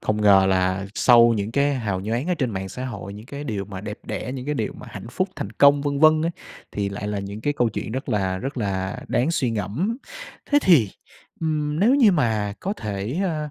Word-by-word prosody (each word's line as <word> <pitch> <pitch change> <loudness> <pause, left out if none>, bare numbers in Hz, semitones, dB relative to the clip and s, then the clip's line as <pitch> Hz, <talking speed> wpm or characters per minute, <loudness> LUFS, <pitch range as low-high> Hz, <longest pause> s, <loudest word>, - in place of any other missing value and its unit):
Không 105 0 -1
ngờ 100 -2 +6
là 95 +1 +1
sau 120 -1 +6
những 105 +2 -3
cái 140 +2 +2
hào 105 -7 -2
nhoáng 115 - -2
ở 180 - +2
trên 130 -7 -1
mạng 95 -2 -4
xã 125 +7 -6
hội, 100 -6 -6
những 105 +3 -11
cái 140 +2 -7
điều 105 -7 -3
mà 95 -1 -8
đẹp 105 +1 -6
đẽ, 125 - -4
những 130 -1 -6
cái 150 - -1
điều - - -2
mà 125 - -12
hạnh 105 +1 -8
phúc, 185 +9 -1
thành - - -4
công, 140 0 +5
vân 140 -1 -1
vân 155 0 +6
ấy, 165 - +1 0.4
thì 100 -1 -1
lại 100 +1 -5
là 105 -1 -2
những 100 +2 -6
cái 145 +6 0
câu 120 -5 +1
chuyện 105 +1 -5
rất 130 +3 -4
là 95 -3 0
rất 135 +7 -5
là 95 -4 -2
đáng 125 +6 +1
suy 130 -7 0
ngẫm. 115 - -2 0.5
Thế 290 - +6
thì, 150 - +5 0.5
ưm, 150 -1 -1
nếu 235 +7 +5
như 235 -8 +6
mà 110 - +1
có 195 - -2
thể, 105 - -4
a, 155 -4 -2
115 Hz, 235 wpm, -23 LUFS, 100-145 Hz, 0.5 s, ngờ